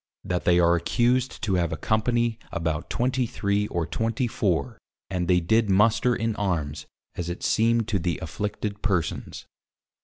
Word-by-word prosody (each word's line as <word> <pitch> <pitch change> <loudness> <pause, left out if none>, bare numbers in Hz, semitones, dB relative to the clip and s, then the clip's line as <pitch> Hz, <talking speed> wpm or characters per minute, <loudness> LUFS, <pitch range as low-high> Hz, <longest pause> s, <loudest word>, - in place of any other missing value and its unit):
That 90 -1 -2
they 90 0 +5
are 85 0 +5
accused 120 +8 +1
to 100 - 0
have 85 - -1
a 80 - -3
Company 115 +5 0
about 80 -2 -2
23 115 -5 0
or 85 -4 -2
24 115 - -1 0.3
and 90 -2 -1
they 90 0 +4
did 110 +5 +2
Muster 110 +5 +3
in 115 -1 -1
Armes, 80 -7 -2 0.3
as 85 -1 -4
it 85 - -5
seemed 115 0 +2
to 100 -3 +1
the 85 0 -1
Afflicted 105 +4 -4
Persons. 95 -6 -2
105 Hz, 150 wpm, -25 LUFS, 85-115 Hz, 0.3 s, they